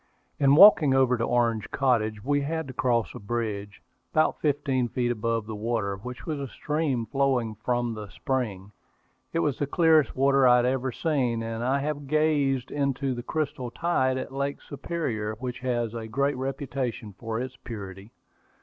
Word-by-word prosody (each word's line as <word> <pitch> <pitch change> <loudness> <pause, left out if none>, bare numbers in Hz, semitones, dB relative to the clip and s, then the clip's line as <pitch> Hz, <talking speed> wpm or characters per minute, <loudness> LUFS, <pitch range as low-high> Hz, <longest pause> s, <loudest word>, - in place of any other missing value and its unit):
In 140 0 +5
walking 160 -7 +8
over 130 -1 +4
to 115 - -2
Orange 115 -2 +1
Cottage 110 -5 0
we 145 +2 +1
had 160 +1 -3
to 130 - -7
cross 120 -3 0
a - - -8
bridge, 105 -2 -4 0.3
about 155 0 +2
fifteen 140 -4 +1
feet 120 0 -1
above 115 -1 -1
the 110 - -6
water, 105 -2 -1
which 125 +6 -8
was 155 -3 -3
a 140 - -4
stream 150 -4 -1
flowing 130 -4 0
from 120 +2 -1
the 105 -1 -7
spring. 105 -8 -3 0.6
It - - -2
was 145 -5 0
the 145 - 0
clearest 160 -2 +3
water 135 0 +4
I 125 - +7
had 120 0 +3
ever 130 0 0
seen, 125 -6 0
and 115 +1 -4
I 135 +3 +1
have 145 -1 -3
gazed 145 -4 +1
into 140 -2 -1
the 120 - -5
crystal 140 -2 -3
tide 130 -3 0
of 130 - -5
Lake 140 +1 -2
Superior, 125 -9 -3
which 125 +2 -5
has 120 -3 -1
a 115 -1 -5
great 140 +5 0
reputation 130 -4 -4
for 115 -1 -3
its 130 +1 -5
purity. 100 -2 -8
130 Hz, 175 wpm, -26 LUFS, 115-140 Hz, 0.6 s, walking